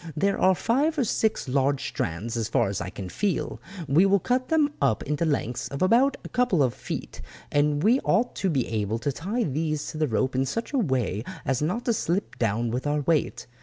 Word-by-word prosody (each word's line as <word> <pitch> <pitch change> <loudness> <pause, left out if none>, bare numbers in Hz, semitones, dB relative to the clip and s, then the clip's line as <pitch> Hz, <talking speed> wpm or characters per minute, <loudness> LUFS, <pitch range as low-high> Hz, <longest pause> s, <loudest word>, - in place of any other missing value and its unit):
There 200 +5 +1
are 185 0 +5
five 285 - +1
or 275 - +3
six 220 - 0
large 135 +1 +1
strands 105 +8 -3
as 115 -2 -1
far 115 -4 +2
as 100 - -3
I 90 - -4
can 95 0 -7
feel; 195 - -2 0.3
we 160 +8 +5
will 200 +1 +4
cut 250 +6 0
them 310 -3 +2
up 135 -6 +2
into 150 +3 -1
lengths 125 -6 -1
of 140 +5 -3
about 255 +7 +4
a - - -8
couple 220 - +2
of 125 -3 +1
feet - - -6 0.3
and 145 +1 +2
we 240 +5 +5
ought 245 -1 +1
to 195 - 0
be 135 -7 0
able 110 0 -1
to 145 +5 -1
tie 205 - -2
these 155 -2 -1
to 155 - -7
the 155 - +2
rope 130 +2 0
in 130 +1 +1
such 230 - -3
a 275 - +2
way 125 - 0 0.2
as 135 0 0
not 185 +11 -1
to 235 - +2
slip 195 -1 -2
down 115 +1 0
with 125 +4 -2
our 150 0 +1
weight. 155 +1 0
150 Hz, 220 wpm, -26 LUFS, 125-210 Hz, 0.3 s, are